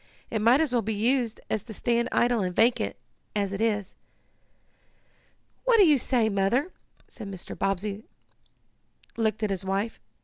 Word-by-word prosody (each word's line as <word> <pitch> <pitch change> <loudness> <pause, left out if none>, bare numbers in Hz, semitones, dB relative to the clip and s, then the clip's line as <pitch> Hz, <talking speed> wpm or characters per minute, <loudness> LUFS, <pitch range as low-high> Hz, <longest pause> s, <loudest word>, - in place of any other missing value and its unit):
It 220 - -1
might 235 +5 +5
as 315 -5 +1
well 240 - +3
be 220 0 -2
used 235 +1 0
as 220 - -1
to 220 0 -10
stand 235 +2 0
idle 240 -2 +2
and 180 -2 -2
vacant, 225 - +2 0.4
as 200 -1 -1
it 200 - -3
is." 210 -4 0 1.7
"What - - +4
do 405 - +7
you 300 -4 +5
say, 240 -3 +2
Mother?" 215 - +1 0.5
and 205 -3 -6
Mr. 185 -2 -8
Bobbsey 195 +2 -2 1.1
looked 220 -1 0
at 210 - 0
his 190 -1 -2
wife. 195 +4 -2
220 Hz, 160 wpm, -27 LUFS, 200-240 Hz, 1.7 s, do